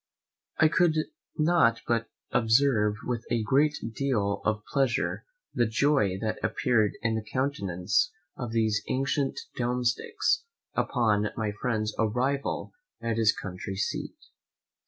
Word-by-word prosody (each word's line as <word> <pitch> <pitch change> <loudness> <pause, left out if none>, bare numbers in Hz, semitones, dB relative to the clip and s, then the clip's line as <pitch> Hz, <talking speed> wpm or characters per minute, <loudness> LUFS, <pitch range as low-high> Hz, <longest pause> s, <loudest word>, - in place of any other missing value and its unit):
I 155 - +6
could 165 0 +3 0.4
not 155 -8 +3
but 115 -1 0 0.2
observe 115 -2 +3
with 120 -2 -2
a 115 -2 +1
great 145 +6 +3 0.2
deal 105 -7 0
of 105 -1 0
pleasure 135 -4 +1 0.3
the 120 -3 +2
joy 110 -5 +2
that 110 -1 -2
appeared 110 -5 +2
in 115 -1 +1
the 110 -1 -2
countenance 100 -9 0 0.2
of 120 -3 -5
these 110 -2 +1
ancient 135 +1 0 0.2
domesticks 125 - 0 0.3
upon 105 -4 +1
my 110 -2 -1
friend's 110 0 -2
arrival 125 +6 0 0.3
at 115 -1 -2
his 110 -1 +5
country 95 +1 -6
seat. 100 - -3
115 Hz, 120 wpm, -28 LUFS, 105-135 Hz, 0.4 s, I